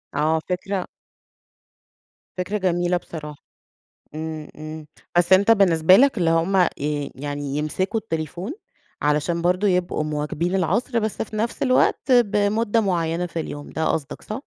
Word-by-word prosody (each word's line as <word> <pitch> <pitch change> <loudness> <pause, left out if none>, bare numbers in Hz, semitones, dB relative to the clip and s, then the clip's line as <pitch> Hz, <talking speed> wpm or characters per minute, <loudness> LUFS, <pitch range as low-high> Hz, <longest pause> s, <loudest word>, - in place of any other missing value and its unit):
آه 155 +2 +2
فكرة 185 +1 -2 1.5
فكرة 190 +3 -1
جميلة 175 -2 +1
بصراحة، 150 -4 -9 0.7
إمم، 155 -1 -5
إمم، 155 0 -8 0.3
بس 175 +1 +3
أنت 200 +4 +6
بالنسبة 185 -5 +6
لك 270 +1 +4
اللي 170 -2 +2
هم 165 +4 +2 0.2
ي 145 0 -2
يعني 145 0 -4
يمسكوا 185 +8 -1
التليفون، 175 - -4 0.5
علشان 150 +3 +1
برضه 180 +4 +2
يبقوا 180 -4 0
مواكبين 150 +4 -2
العصر، 220 - +1
بس 215 -1 -2
في 215 0 -7
نفس 230 +5 -2
الوقت 255 0 +2
بمدة 215 -1 +3
معيّنة 175 -3 0
في 165 -1 -4
اليوم 145 -2 -7
ده 160 - -2
قصدك، 145 -3 -4
صح؟ 220 +6 -6
175 Hz, 135 wpm, -23 LUFS, 155-205 Hz, 1.5 s, أنت